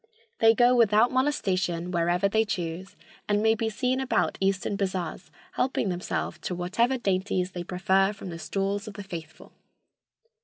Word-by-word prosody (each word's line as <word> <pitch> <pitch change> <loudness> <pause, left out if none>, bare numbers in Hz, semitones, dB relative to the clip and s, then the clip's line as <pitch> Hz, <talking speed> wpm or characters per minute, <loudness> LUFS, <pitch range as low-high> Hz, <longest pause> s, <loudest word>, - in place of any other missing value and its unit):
They 225 0 +6
go 245 +1 +5
without 225 0 +4
molestation 185 - 0
wherever 175 +2 +2
they 220 +2 +2
choose, 180 -2 -4 0.3
and 205 0 +3
may 220 0 +5
be 225 0 -1
seen 250 +4 -1
about 265 -1 0
eastern 195 +1 0
bazars 185 -3 -3 0.2
helping 255 -5 0
themselves 180 0 -3
to 180 - -4
whatever 230 +9 +1
dainties 185 -3 -1
they 175 -1 -5
prefer 190 +2 +2
from 200 -2 -8
the 165 - -7
stalls 200 +3 -2
of 210 - -8
the 205 - -7
faithful." 165 -4 -9
195 Hz, 155 wpm, -27 LUFS, 180-220 Hz, 0.3 s, They